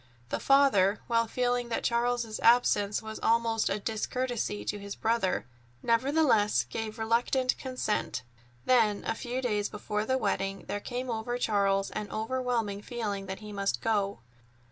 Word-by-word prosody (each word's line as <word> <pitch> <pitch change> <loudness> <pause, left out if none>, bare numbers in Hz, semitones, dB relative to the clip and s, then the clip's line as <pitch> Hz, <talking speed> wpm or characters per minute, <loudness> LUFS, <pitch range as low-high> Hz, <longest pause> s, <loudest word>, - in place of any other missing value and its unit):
The - - -1
father, 260 -8 +4
while 230 -1 +2
feeling 245 0 0
that 230 - -2
Charles's 235 -2 0
absence 220 -3 +3
was 220 0 -6
almost 230 -1 +2
a 195 - 0
discourtesy 220 - -2
to 205 - -2
his 200 0 -6
brother, 225 -4 0 0.4
nevertheless 235 -3 +3
gave 220 0 -5
reluctant 240 +3 +1
consent. 255 - -2 0.4
Then, 225 -5 +3
a - - 0
few 250 +2 -4
days 210 -4 0
before 210 0 -3
the 260 - +2
wedding, 195 -4 -2
there 205 - -2
came 245 +3 -4
over 230 +2 -2
Charles 195 -4 +1
an 210 -1 -4
overwhelming 225 -3 -1
feeling 210 -4 -4
that 190 +2 -6
he 210 -1 -8
must 195 -11 -1
go. 200 - 0
225 Hz, 145 wpm, -29 LUFS, 205-245 Hz, 0.4 s, father